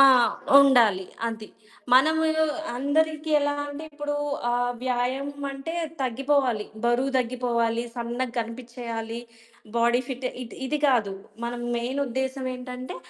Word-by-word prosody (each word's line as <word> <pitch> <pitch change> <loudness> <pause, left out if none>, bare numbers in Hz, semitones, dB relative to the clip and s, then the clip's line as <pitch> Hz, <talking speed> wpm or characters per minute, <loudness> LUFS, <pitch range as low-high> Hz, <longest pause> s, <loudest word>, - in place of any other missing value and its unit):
ఆ! - - +11 0.6
ఉండాలి. 235 -9 +5 0.2
అది. 220 -2 -4 0.5
మనము 315 +5 +6 0.5
అందరికి 310 +3 +1
ఎలా 290 0 +1
అంటే, 290 +2 -7
ఇప్పుడూ 295 0 -3 0.3
ఆహ్, 245 0 +1
వ్యాయామమంటే 275 +4 -2 0.3
తగ్గిపోవాలి. 260 -3 +1 0.2
బరువు 240 +3 +2
దగ్గిపోవాలి, 235 -2 0
సన్నగ 240 +1 -2
గనిపిచ్చెయ్యాలి, 230 -1 -5 0.6
బాడీ 235 +1 +4
ఫిట్ 260 -1 -3 0.2
ఇది 240 - -10
ఇది 300 +3 0
గాదు. 230 -8 +3 0.3
మన 235 - -2 0.2
మెయినుద్దేశమేంటంటే, 255 0 -3
255 Hz, 100 wpm, -26 LUFS, 235-275 Hz, 0.6 s, ఆ